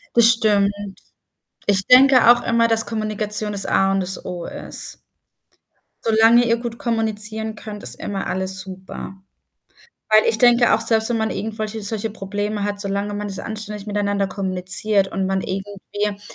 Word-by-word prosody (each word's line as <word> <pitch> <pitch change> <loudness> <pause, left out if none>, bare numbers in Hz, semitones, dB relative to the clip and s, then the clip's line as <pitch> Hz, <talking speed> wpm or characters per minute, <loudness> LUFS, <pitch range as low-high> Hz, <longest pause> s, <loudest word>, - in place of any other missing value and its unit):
Das 235 -1 +7
stimmt. 205 -3 +2 1.0
Ich 195 -1 +3
denke 255 -1 +6
auch 240 0 +2
immer, 230 0 +2
dass 225 0 +2
Kommunikation 215 -1 -1
das 200 -1 0
A 195 0 +2
und 195 - +1
das 185 0 -1
O 175 -1 -6
ist. - - -3 1.1
Solange 225 +2 +5
ihr 230 0 +1
gut 235 -1 -6
kommunizieren 220 -1 -2
könnt, 210 -1 -9
ist - - 0
immer 195 -1 -5
alles 190 +1 0
super. 190 0 -8 1.0
Weil 215 0 +5
ich 225 - +1
denke 240 0 +5
auch, - - 0
selbst 225 -1 +2
wenn 240 - -1
man 220 0 -1
irgendwelche 215 +1 -5
solche 215 +1 -3
Probleme 205 0 -4
hat, 205 0 -3
solange 200 0 -3
man 205 0 -4
das 195 -1 -6
anständig 210 -2 -7
miteinander 205 -1 -1
kommuniziert 190 +1 0
und 190 0 -3
man 190 0 -1
irgendwie 200 +1 -5
210 Hz, 160 wpm, -20 LUFS, 195-225 Hz, 1.1 s, Das